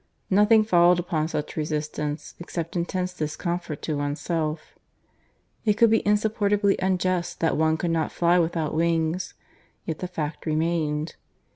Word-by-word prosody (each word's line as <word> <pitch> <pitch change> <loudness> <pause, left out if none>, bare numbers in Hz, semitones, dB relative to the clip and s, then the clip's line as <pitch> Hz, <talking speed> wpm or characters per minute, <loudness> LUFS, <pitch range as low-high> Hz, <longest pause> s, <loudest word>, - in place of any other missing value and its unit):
Nothing 210 +3 +5
followed 175 -4 +5
upon 165 -3 -1
such 150 -2 -4
resistance 150 -1 -3
except 170 -1 -5
intense 180 +1 -2
discomfort 165 0 -4
to 155 - -1
oneself. 155 +2 -2 0.9
It 210 -1 +1
might 230 - +6
be 225 - +4
insupportably 205 -1 +2
unjust 185 -1 0
that 165 - +2
one 160 0 +2
could 170 +1 -1
not 160 -1 0
fly 175 +1 +3
without 165 -2 0
wings, 165 +2 0 0.5
yet 160 -1 -4
the 180 - -3
fact 160 -3 -5
remained. 155 -1 -1
170 Hz, 135 wpm, -25 LUFS, 155-185 Hz, 0.9 s, might